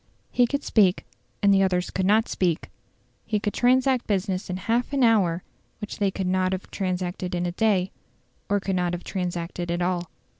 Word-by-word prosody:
He 245 -1 +3
could 280 +3 -2
speak, 195 -4 +3 0.4
and 200 -1 +6
the 195 - +4
others 180 -2 +1
could 190 0 0
not 220 +2 +4
speak. 175 -4 -1 0.5
He 210 - -1
could 205 -1 -2
transact 255 0 +2
business 190 -2 -1
in 180 - -2
half 235 +7 -1
an 275 -2 +2
hour 190 -7 +3 0.4
which 210 0 -7
they 200 -2 +2
could 190 0 -3
not 185 0 +1
have 190 - -5
transacted 180 -1 -2
in 175 0 -1
a 175 - -1
day, 190 -1 +1 0.6
or 205 0 +2
could 195 -1 -2
not 180 -1 0
have 175 - -4
transacted 175 -1 -4
at 175 +1 0
all. 175 -1 -1
190 Hz, 190 wpm, -25 LUFS, 180-210 Hz, 0.6 s, and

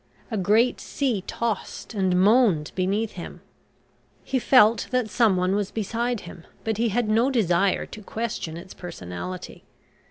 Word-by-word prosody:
A - - -1
great 215 +6 +3
sea 245 -9 -1
tossed 230 0 -3
and 190 -3 +1
moaned 200 -6 +4
beneath 200 +4 0
him. 175 - -9 0.8
He 265 - -1
felt 230 -3 +5
that 250 -4 0
someone 190 -5 +3
was 205 -1 0
beside 230 +2 -2
him, 170 -1 -11 0.2
but 220 -2 -1
he 230 +1 +1
had 230 +2 0
no 225 +5 +3
desire 195 -6 +2
to 215 - -10
question 215 -7 -4
its 185 +2 -10
personality. 175 - -7
210 Hz, 145 wpm, -25 LUFS, 185-235 Hz, 0.8 s, felt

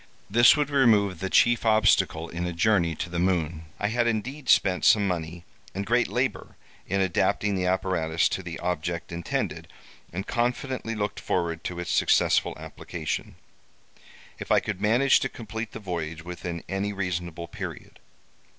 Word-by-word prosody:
This 120 +5 +7
would 145 -1 0
remove 105 - +3
the 95 - -3
chief 120 +3 +4
obstacle 100 -7 +3
in 85 +2 -4
a 90 - -3
journey 85 -2 +2
to 75 - -4
the 85 0 -3
moon. 85 -3 0
I 105 - 0
had 120 +1 +1
indeed 130 +5 -3
spent 90 -2 +4
some 105 -2 +5
money 85 -1 -4 0.3
and 100 +1 -3
great 120 +2 +2
labor - - -2 0.3
in 100 +1 0
adapting 95 +2 +1
the 90 -1 0
apparatus 90 -3 +1
to - - -3
the 85 -3 -6
object 85 -1 -3
intended, 85 0 -3 0.4
and 95 +3 -4
confidently 125 -1 -2
looked 105 -1 -3
forward 85 -2 -2
to 90 -1 -4
its 90 - -3
successful - - +2
application, 80 -3 -5 1.0
if - - -6
I - - +6
could 100 -2 -5
manage 120 +6 +4
to 135 - -2
complete 110 -1 -6
the - - -7
voyage 80 -5 -5
within 90 -1 -6
any 95 +2 -2
reasonable 85 -3 -4
period. - - -8
95 Hz, 160 wpm, -26 LUFS, 85-110 Hz, 1.0 s, This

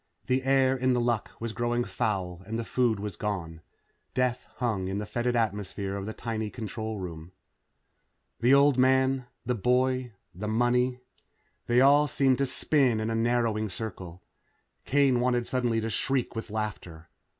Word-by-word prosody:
The 130 +1 +1
air 135 0 +3
in 130 0 +1
The 125 - +2
Luck 120 -2 0
was 115 -1 -4
growing 120 +1 0
foul 95 -3 -2
and 110 +1 -3
the 115 - -2
food 120 -3 +1
was 105 -2 -5
gone. 85 -6 -4 0.5
Death 125 -1 0
hung 110 -7 -1
in 95 +1 -2
the 105 - -3
fetid 120 +3 -1
atmosphere 100 -3 -2
of 100 0 -5
the - - -3
tiny 110 -2 -3
control 110 -1 -5
room. 85 -2 -7 1.1
The 120 +2 +3
old 140 -1 +5
man 130 0 +3 0.2
the 125 - +1
boy 125 +2 +1 0.2
the 105 +4 -5
money. 125 +3 +1 0.7
They 120 +1 +4
all 145 +2 +6
seemed 135 -2 +2
to 140 - +2
spin 130 -3 +2
in 110 +1 -1
a - - -1
narrowing 115 -2 +1
circle. 90 -4 -7 0.6
Kane 135 -3 +3
wanted 120 -1 +1
suddenly 120 -3 0
to 110 +1 -3
shriek 135 -1 -1
with 115 - -5
laughter. 105 -7 -5
120 Hz, 160 wpm, -28 LUFS, 105-125 Hz, 1.1 s, all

